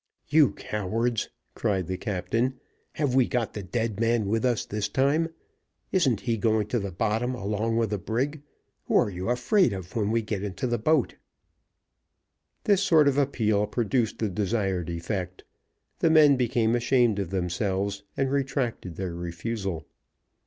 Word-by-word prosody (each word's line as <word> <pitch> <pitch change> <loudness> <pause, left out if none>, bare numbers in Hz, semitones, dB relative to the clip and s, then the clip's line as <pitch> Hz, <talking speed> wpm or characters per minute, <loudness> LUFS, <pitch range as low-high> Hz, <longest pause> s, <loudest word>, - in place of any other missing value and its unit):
"You 150 -2 +5
cowards!" 110 +3 -2 0.2
cried 100 -5 0
the 95 +2 -3
captain, 115 +7 -1 0.3
"have 145 -4 0
we 130 -2 +4
got 120 -4 -1
the 105 - -5
dead 110 +2 -2
man 115 -1 +2
with 110 +4 0
us 125 -3 +1
this 105 0 -3
time? 145 +7 +2 0.6
Isn't 135 - +2
he 115 -2 0
going 110 0 +2
to 120 - +1
the 100 -2 -4
bottom 115 +6 -1
along 110 +1 -1
with 115 -2 +1
the 105 - -1
brig? 135 - -2 0.4
Who - - -1
are 105 - +3
you 90 +3 -4
afraid 125 - +3
of 95 -1 -8
when 105 -3 +1
we 115 +1 +1
get 105 -2 -3
into 105 +4 -3
the 120 -2 0
boat?" 150 +3 +1 1.5
This 200 -2 +3
sort 160 -7 +5
of 140 0 +3
appeal 110 -7 +1
produced 115 +1 0
the 110 - -1
desired 95 -2 -1
effect; 90 +2 -4 0.6
the 165 - +3
men 155 -3 +7
became 120 -2 +1
ashamed 120 -3 +2
of 95 -4 -2
themselves, 95 +2 -1 0.2
and 135 -1 +1
retracted 135 - -2
their 95 -1 -4
refusal. 85 0 -4
110 Hz, 160 wpm, -26 LUFS, 100-125 Hz, 1.5 s, men